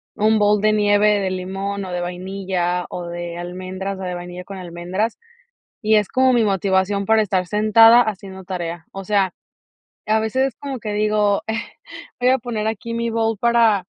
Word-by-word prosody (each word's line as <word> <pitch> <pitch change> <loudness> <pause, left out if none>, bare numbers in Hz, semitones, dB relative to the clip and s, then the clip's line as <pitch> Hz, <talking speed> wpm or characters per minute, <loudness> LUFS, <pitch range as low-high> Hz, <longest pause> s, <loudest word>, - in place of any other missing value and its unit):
un 215 +1 +3
bol 210 0 +3
de 215 0 +3
nieve 210 0 +3
de 190 -1 -1
limón, 195 +2 -4
o 185 - -6
de 180 - -2
vainilla, 180 0 -2
o 175 - -6
de 170 0 -6
almendras, 185 +2 -5
o - - -6
de 180 -1 -3
vainilla 175 +1 -8
con 195 0 -8
almendras 180 +5 -3 0.6
y 215 0 +3
es 210 -2 +2
como 260 0 +3
mi 235 -2 +3
motivación 195 0 +1
para 220 +2 +4
estar 190 -3 0
sentada 225 +3 +6
haciendo 195 -4 -5
tarea. 175 -2 -5
O 195 - -7
sea, 195 -2 +1 0.7
a 215 +1 +3
veces 240 +5 +1
es 260 - -8
como 275 -1 -6
que 210 -1 -4
digo: 210 -1 +1 0.8
"Voy 250 - +4
a 260 - +4
poner 225 -3 -3
aquí 225 +1 -4
mi 235 0 -1
bol 225 -1 0
para 230 -5 +3
200 Hz, 180 wpm, -20 LUFS, 185-220 Hz, 0.8 s, sentada